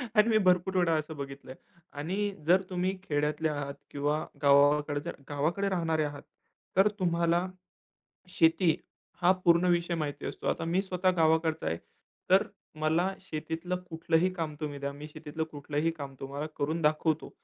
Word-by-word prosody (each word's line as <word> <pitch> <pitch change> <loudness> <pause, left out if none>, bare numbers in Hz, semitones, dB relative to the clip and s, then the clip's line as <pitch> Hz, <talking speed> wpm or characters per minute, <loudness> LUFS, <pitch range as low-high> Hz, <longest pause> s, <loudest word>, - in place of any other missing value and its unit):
आणि 210 +1 +6
मी 220 - +5
भरपूर 180 +1 +3
वेळा 175 -2 +3
असं 155 +1 -6
बघितलंय 135 -1 -7 0.4
आणि 195 +7 -1
जर 180 +4 +5
तुम्ही 185 +1 -1
खेड्यातले 150 -1 0
आहात 145 -2 -3 0.2
किंवा 145 +2 -1 0.2
गावाकड 145 +1 +4 0.3
गावाकडे 165 +8 0
राहणारे 165 -4 +1
आहात 145 -1 -5 0.5
तर 195 +2 +7
तुम्हाला 170 0 +2 0.8
शेती 165 -1 +3 0.5
हा 180 +1 +6
पूर्ण 170 +1 +5
विषय 175 0 +1
माहिती 145 -3 -3
असतो. - - -5
आता - - 0
मी 175 +3 +2
स्वतः 185 -1 +1
गावाकडचा 160 0 +2
आहे, 80 - 0 0.5
तर - - +6 0.4
मला 165 +5 +2
शेतीतलं 165 0 -4
कुठलंही 165 +2 +2
काम 160 -4 -3
तुम्ही 145 -2 -4
द्या. 140 0 -3
मी 145 +2 -8
शेतीतलं 155 +1 -5
कुठलंही 145 +2 -1
काम 140 -4 -7
तुम्हाला 140 +2 -4
करून 155 +4 -1
दाखवतो. 155 +1 +1
160 Hz, 150 wpm, -30 LUFS, 145-175 Hz, 0.8 s, तर